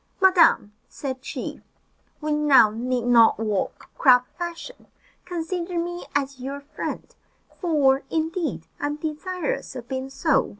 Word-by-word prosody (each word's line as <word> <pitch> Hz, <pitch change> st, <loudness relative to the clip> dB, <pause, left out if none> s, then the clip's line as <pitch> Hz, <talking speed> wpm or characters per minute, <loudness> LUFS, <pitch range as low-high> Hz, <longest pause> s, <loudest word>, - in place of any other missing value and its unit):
"Madam," 360 Hz, -, +5 dB, 0.2 s
said 265 Hz, -2 st, -5 dB
she, -, -, -6 dB, 0.6 s
"we 305 Hz, 0 st, -2 dB
now 295 Hz, -7 st, +5 dB
need 245 Hz, +2 st, -2 dB
not 235 Hz, -2 st, +6 dB
walk 215 Hz, -3 st, -2 dB
crab 250 Hz, -3 st, +6 dB
fashion. 345 Hz, +8 st, -7 dB, 0.4 s
Consider 350 Hz, 0 st, -3 dB
me 350 Hz, +1 st, -3 dB
as 275 Hz, -1 st, -1 dB
your 275 Hz, +3 st, -5 dB
friend, 285 Hz, -, -5 dB, 0.5 s
for, 285 Hz, -6 st, +3 dB
indeed, 325 Hz, +1 st, -2 dB
I -, -, -1 dB
am 290 Hz, -, -2 dB
desirous 315 Hz, +1 st, -4 dB
of 245 Hz, -2 st, -7 dB
being 265 Hz, +1 st, -4 dB
so." 280 Hz, 0 st, +1 dB
295 Hz, 130 wpm, -24 LUFS, 260-340 Hz, 0.6 s, not